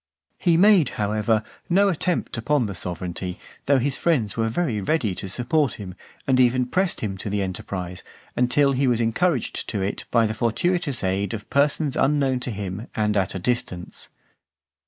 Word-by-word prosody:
(448) 180 - 0
VI. - - +7
He 165 - +4 0.2
made, 150 -8 +2
however, 105 +1 +1 0.3
no 195 +3 +4
attempt 180 -1 -1
upon 125 +3 +1
the 100 - -4
sovereignty, 90 0 -4 0.3
though 140 0 +5
his 130 +1 0
friends 135 -12 +1
were 115 -1 0
very 115 -5 -1
ready 110 - 0
to 95 - -6
support 125 - +1
him, 95 -4 -7 0.3
and 130 -2 +3
even 125 0 +4
pressed 185 +7 0
him 95 -3 -3
to 105 - -4
the 100 0 0
enterprise, 90 -1 -5 0.3
until 140 +3 +3
he 135 0 +1
was 120 -2 +2
encouraged 125 +5 0
to 100 -3 -1
it 100 - -3
by 115 -2 +3
the 110 - -1
fortuitous 140 - 0
aid 95 +2 0
of 105 - -9
persons 145 0 +2
unknown 135 -2 +2
to 125 - -3
him 100 0 -5
and 105 -1 +1
at 95 -2 0
a - - -1
distance. 95 -4 -3
115 Hz, 180 wpm, -24 LUFS, 100-140 Hz, 0.3 s, VI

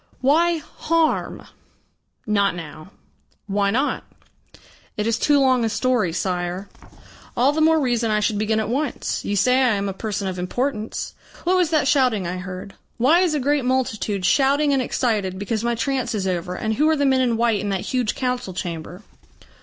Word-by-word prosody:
Why 330 +6 +3
harm?" 320 +1 -1 0.8
"Not 200 -3 +1
now." 160 0 -9 0.6
"Why 200 0 0
not?" 260 +8 0 0.9
"It 210 - -1
is 230 0 0
too 290 -1 +3
long 260 -3 +3
a 225 - +1
story, 220 -4 +1
Sire." 180 +2 -2 0.7
"All 255 +4 +4
the 315 +2 -1
more 320 0 +4
reason 240 -4 0
I 210 0 +2
should 210 0 0
begin 215 +1 +1
at 220 - -1
once. 275 +2 -2
You 205 - -2
say 250 +6 +3
I 245 -4 +3
am 200 0 -2
a 195 - -3
person 205 0 -3
of 185 -1 -4
importance. 220 +4 -3 0.3
What 360 +2 +2
was 360 -3 +2
that 310 -4 +2
shouting 250 -9 +2
I 175 +2 -3
heard? 185 +1 -7 0.2
Why 280 +9 +4
is 355 -4 +2
a - - +1
great 285 +1 +1
multitude 225 -6 -1
shouting 280 +8 +3
and 270 - +2
excited 215 -7 -1
because 215 +3 -2
my 235 0 0
trance 260 0 -1
is 195 -2 -2
over, 180 -1 -2
and 220 +2 -2
who 300 +7 +2
are 315 - +2
the 285 - +1
men 265 -1 +3
in 240 -3 +1
white 230 -2 +2
in 205 - -3
that 195 -2 -1
huge 250 -4 -1
council 250 -7 -2
chamber?" 175 +2 -6
230 Hz, 185 wpm, -22 LUFS, 200-270 Hz, 0.9 s, All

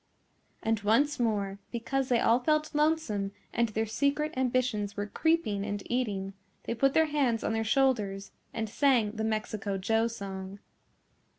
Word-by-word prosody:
And 225 -1 +1
once 255 +9 +2
more 200 -4 0
because 260 +3 -2
they 240 -2 +3
all 235 +2 +4
felt 305 +3 +1
lonesome 295 -11 +1 0.2
and 235 -1 +1
their 220 +1 -1
secret 280 +7 0
ambitions 250 -6 0
were 205 - -1
creeping 220 -5 0
and 205 -1 -3
eating, 200 -6 -1 0.3
they - - -2
put 275 +4 +2
their 320 - +5
hands 275 -7 0
on - - 0
their 225 0 0
shoulders 215 -6 +1 0.2
and 225 -1 -3
sang 240 -2 +2
the 220 0 -4
Mexico 215 -2 -2
Joe 225 +4 +1
song. 195 -3 -6
225 Hz, 155 wpm, -29 LUFS, 205-270 Hz, 0.3 s, their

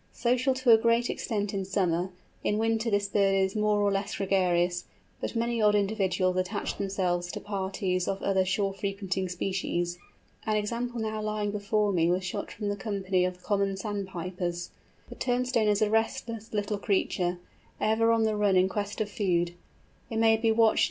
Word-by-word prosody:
Social 250 +2 +1
to 260 -2 +3
a 225 - +8
great 235 +1 +2
extent 205 -3 -2
in 195 -1 -1
summer, 185 -2 0 0.3
in 210 - +1
winter 225 +1 +1
this 205 -1 +1
bird 195 -1 +2
is 190 +1 +1
more 210 -1 +2
or 205 0 +3
less 200 +1 -2
gregarious; 180 -2 +1 0.3
but - - -4
many 235 0 0
odd 210 -1 +5
individuals 195 -3 +1
attach 185 +3 -2
themselves 180 -3 -1
to - - -5
parties 190 -2 -2
of 195 - -1
other 190 -1 +2
shore 195 +1 0
frequenting 195 -2 -2
species. 175 -1 -2 0.4
An 215 - 0
example 235 +3 -2
now 220 -1 -2
lying 210 -1 -1
before 210 0 +1
me 170 -1 +3
was 180 +2 +1
shot 190 +3 -4
from 205 -1 -4
the 205 - -1
company 195 -3 0
of 180 0 -5
Common 200 -2 0
Sandpipers. 185 -3 -4 0.4
The - - -7
Turnstone 245 -2 +1
is 210 0 +3
a 210 - +2
restless 225 0 -1
little 205 -1 -1
creature, 180 -3 0 0.4
ever 225 +1 +3
on 225 -1 +3
the 220 -1 +1
run 205 -2 +2
in 185 +1 +5
quest 205 +2 -3
of 215 - 0
food. 175 -4 0
200 Hz, 165 wpm, -28 LUFS, 185-215 Hz, 0.4 s, a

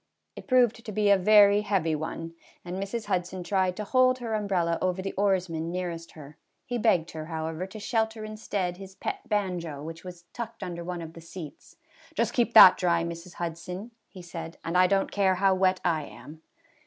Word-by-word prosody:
It - - -11
proved 245 -3 +3
to 215 - -6
be 210 -1 +2
a - - +8
very 205 +1 +6
heavy 195 -6 0
one, 165 +2 -4 0.3
and 180 +2 -4
Mrs. 215 +3 -4
Hud 185 -3 0
son 185 0 -7
tried 185 -1 0
to 210 - -3
hold 255 +3 +3
her 235 -3 -4
umbrella 185 -6 0
over 185 0 0
the 195 +1 -4
oarsman 180 -5 0
nearest 175 -2 -5
her; 150 -1 -13 0.3
he 245 0 -3
begged 175 -7 +2
her, 155 -1 -7
however, 160 +2 -4
to 215 +3 -10
shelter 220 0 -1
in 215 0 -7
stead 185 -4 -3
his 190 0 -11
pet 395 - -5
banjo, 180 -8 -2
which 165 +1 -8
was 180 -1 -10
tucked 230 -3 -6
under 175 -2 -5
one 175 -1 -5
of 160 0 -9
the 165 - -11
seats. 165 -2 -10 0.2
" 325 0 -25
Just 235 0 +1
keep 235 -1 +1
that 185 - +10
dry, 170 -2 +1
Mrs. 170 +1 -7
Hudson," 180 +6 -5 0.2
he 185 -3 -12
said, 165 -1 -8
"and 165 - -3
I 180 0 +6
don't 195 +1 +1
care 195 -2 +2
how 195 +1 +3
wet 185 0 +2
I 160 -4 +1
am." 155 +2 -12
185 Hz, 205 wpm, -27 LUFS, 170-210 Hz, 0.3 s, that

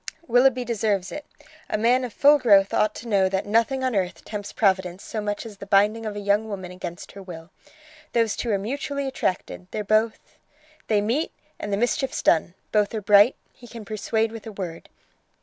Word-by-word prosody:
"Willoughby 250 0 +3
deserves 210 -5 -1
it. 295 - -7 0.4
A - - 0
man 245 +4 +3
of 245 - -4
full 290 +6 +5
growth 200 -6 +5
ought 215 0 +2
to 235 - -8
know 195 -4 +3
that 190 0 -1
nothing 230 +5 +1
on 255 -3 0
earth 185 -2 -2
tempts 205 -1 -6
Providence 190 -3 0
so 215 - -4
much 205 +2 -3
as 215 -3 -10
the 200 - -10
binding 210 +3 +3
of 210 - -5
a - - -4
young 205 +2 +1
woman 190 -3 -6
against 175 -1 -8
her 200 - -10
will. 175 -2 -10 0.6
Those 230 -2 +2
two 240 - -3
are 205 - +2
mutually 280 +6 -3
attracted: 185 -7 -3
they're 210 - -4
both... 215 +2 0 0.5
They 210 -2 +2
meet, 245 +10 -1 0.3
and 205 - -5
the 200 - +1
mischief's 250 +4 -1
done: 170 +2 +2 0.2
both 210 0 +1
are 215 - -2
bright. 205 +4 +6 0.2
He 245 - -15
can 230 -2 -10
persuade 220 +1 -1
with 225 0 -9
a - - -6
word. 180 -5 -7
210 Hz, 200 wpm, -24 LUFS, 195-235 Hz, 0.6 s, bright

